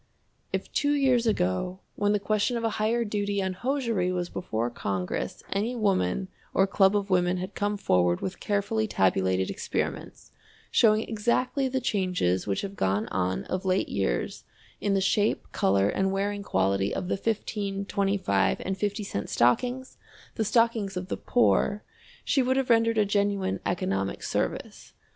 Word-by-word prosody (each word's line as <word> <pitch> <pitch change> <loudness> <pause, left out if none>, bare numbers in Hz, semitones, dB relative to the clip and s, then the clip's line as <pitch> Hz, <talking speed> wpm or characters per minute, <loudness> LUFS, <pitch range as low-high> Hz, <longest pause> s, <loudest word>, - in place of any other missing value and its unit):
If - - -4
two 290 0 +2
years 260 -5 +3
ago 180 - 0
when 205 0 +1
the 210 - +2
question 215 +4 0
of 230 - -4
a 225 - +1
higher 230 +2 +1
duty 205 -1 -1
on 190 -1 -1
hosiery 230 -4 -1
was 175 -1 -2
before 120 -8 -2
Congress 95 - -3
any 215 +5 -1
woman 195 - +1 0.3
or 195 - +5
club 195 +1 +3
of 200 -1 -3
women 180 0 +2
had 185 +2 -5
come 205 0 -1
forward 90 - +2
with 185 -1 -5
carefully 210 +2 0
tabulated 95 - +1
experiments, - - -4 0.4
showing 215 -1 +4
exactly 240 +5 0
the 260 0 -1
changes 180 - 0
which 100 - 0
have 200 0 -6
gone 100 - 0
on 95 0 -1
of 185 0 -3
late 190 0 +1
years 80 -12 -2 0.4
in 200 -1 +1
the 195 - +2
shape, 205 +2 +1
color, 95 +1 +2
and 190 - 0
wearing 200 +1 -1
quality 95 - +1
of 185 - -3
the - - 0
15, 200 -1 -2
25, 190 - +1
and 190 0 -2
50 205 +1 -1
cent 100 - -4
stockings, 250 - +1 0.4
the 220 - -1
stockings 225 -4 +1
of 180 +1 -5
the - - -2
poor, 210 -3 +2 0.4
she 275 - +3
would 260 +1 +1
have 265 -2 +1
rendered 230 0 +3
a 210 - +4
genuine 200 -1 0
economic 95 - -1
service. - - -3
195 Hz, 160 wpm, -27 LUFS, 175-220 Hz, 0.4 s, or